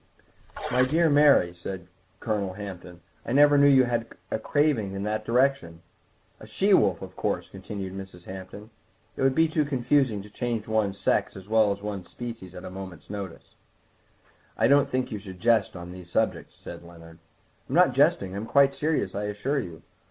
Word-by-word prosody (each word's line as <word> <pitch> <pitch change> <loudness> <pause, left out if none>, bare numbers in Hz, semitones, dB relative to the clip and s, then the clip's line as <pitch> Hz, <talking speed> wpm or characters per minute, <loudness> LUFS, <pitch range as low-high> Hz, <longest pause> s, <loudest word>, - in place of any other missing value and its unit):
"My 125 +1 +3
dear 160 +5 +2
Mary," 145 -12 +5
said 90 +1 -7 0.4
Colonel 100 -3 -2
Hampton, 90 -3 -9 0.2
"I 115 - -3
never 145 +1 +6
knew 145 0 +6
you 135 -2 +6
had 120 -2 -1 0.2
a - - -1
craving 130 -7 +1
in 100 0 -4
that 105 +1 -2
direction." 125 -9 0 0.6
"A - - -12
she - - +2
wolf, - - +3
of - - -10
course," - - -2
continued 95 0 -7
Mrs. 95 -2 -9
Hampton; 95 +4 -10 0.4
"it - - -6
would 135 0 +3
be 160 0 +4
too 155 -1 +1
confusing 130 -5 +1
to 105 - -13
change 115 -2 -3
one's 110 -3 0
sex - - 0
as 95 0 -11
well 110 -1 +3
as 100 0 -5
one's 100 -4 -5
species 115 -7 -8
at 90 +1 -9
a - - -7
moment's 95 -1 -9
notice." 100 -4 -7 1.0
"I 110 - +3
don't 140 +1 +4
think 130 0 -1
one 105 - -4
should 95 -2 -10
jest 115 -3 +2
on 90 0 -8
these 90 -1 -11
subjects," - - -1
said - - -10
Leonard. 85 -1 -14 0.5
"I'm - - -2
not - - +5
jesting, 95 -1 +2
I'm 105 +3 -5
quite 140 +3 +4
serious, 150 -8 -1
I 105 +1 -3
assure 105 +8 -1
you. 85 - -8
105 Hz, 185 wpm, -26 LUFS, 95-130 Hz, 1.0 s, never